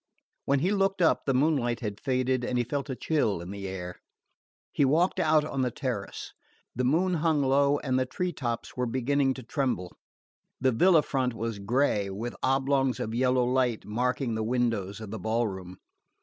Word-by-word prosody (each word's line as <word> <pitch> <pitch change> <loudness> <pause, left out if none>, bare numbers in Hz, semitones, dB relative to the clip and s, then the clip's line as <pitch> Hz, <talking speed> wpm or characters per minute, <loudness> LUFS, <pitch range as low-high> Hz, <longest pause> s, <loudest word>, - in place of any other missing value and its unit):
When 140 -1 +2
he 180 +5 +2
looked 195 -1 +1
up 170 - +3
the 135 - +3
moonlight 130 -4 +1
had 105 -3 -4
faded 130 -1 0
and 125 0 -1
he 120 - +2
felt 140 +4 -3
a 130 - -2
chill 125 - 0
in 85 +2 -7
the 100 -1 -5
air. 90 -1 -6 0.7
He - - +1
walked 165 +8 +2
out 155 -3 +3
on 135 -3 -2
the 125 - +1
terrace. 120 -6 -5 0.4
The 125 - -1
moon 170 +8 +2
hung 160 -3 +2
low 140 +2 +3
and 130 -3 0
the 130 - 0
tree 180 +6 -2
tops 120 -6 -4
were 125 -1 -1
beginning 130 +2 +1
to 130 - -8
tremble. 125 - -2 0.6
The 130 0 +3
villa 165 +6 +5
front 130 -3 -1
was 115 -1 -3
grey, 105 -1 +1
with 110 +5 -5
oblongs 135 -1 +1
of 110 - -3
yellow 125 +1 +2
light 125 -2 0
marking 125 +2 -1
the 110 - -2
windows 115 -4 -1
of 105 -2 -7
the 110 - -5
ball 115 +4 0
room. 95 -2 -7
125 Hz, 190 wpm, -28 LUFS, 115-140 Hz, 0.7 s, villa